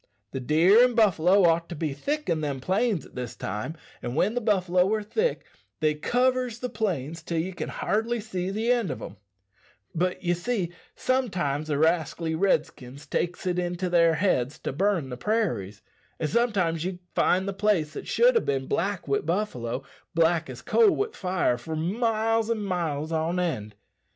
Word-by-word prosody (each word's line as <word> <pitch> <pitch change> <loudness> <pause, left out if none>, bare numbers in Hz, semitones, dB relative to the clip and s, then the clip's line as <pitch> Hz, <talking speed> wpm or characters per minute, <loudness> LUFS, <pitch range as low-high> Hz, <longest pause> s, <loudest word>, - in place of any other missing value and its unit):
The 135 - -3
deer 165 - +5
and 250 -1 +2
buffalo 195 -3 +4
ought 165 0 +2
to 175 - -5
be 150 -2 -2
thick 295 - -3
in 165 -2 0
them 140 -3 -2
plains 190 - 0
at - - -17
this 125 -2 -5
time 105 - -4 0.2
and 120 - -4
when 195 +7 +2
the 245 - -1
buffalo 185 -3 +2
are 215 - -3
thick 445 - -1 0.4
they 155 -2 +2
covers 250 +8 +1
the 250 +1 -4
plains 165 - -2
till 170 0 -3
ye 170 +4 -1
can 175 - -5
hardly 230 +3 -1
see 190 -4 -3
the 220 +4 0
end 235 -7 +1
o' 130 - -2
them; 100 - -9 0.8
but, 180 +3 -1
ye 175 -1 +2
see, 175 0 -2 0.2
sometimes 180 - 0
the 150 -2 0
rascally 160 +1 +1
Redskins 155 -6 -1
takes 175 +2 -2
it 180 -1 0
into 175 0 -2
their 170 -2 +5
heads 145 -9 +1
to - - -3
burn 180 -3 +1
the 125 - -6
prairies, 115 - -1 0.4
and 155 - 0
sometimes 180 -6 +1
ye 185 0 -3 0.2
find 190 +2 +2
the 200 - -2
place 195 -7 +1
that - - -7
should - - +4
ha' 460 - +3
bin 135 -1 -1
black 195 +3 -1
wi' 140 - +2
buffalo, 135 - -2 0.3
black 165 0 +2
as - - -8
a - - -26
coal 455 -3 +5
wi' 415 +3 0
fire 180 -9 0
for 160 -1 -5
miles 225 +5 0
an' 230 -2 0
miles 165 -5 -2
on 165 +2 0
end. 110 -13 -2
175 Hz, 185 wpm, -26 LUFS, 155-215 Hz, 0.8 s, deer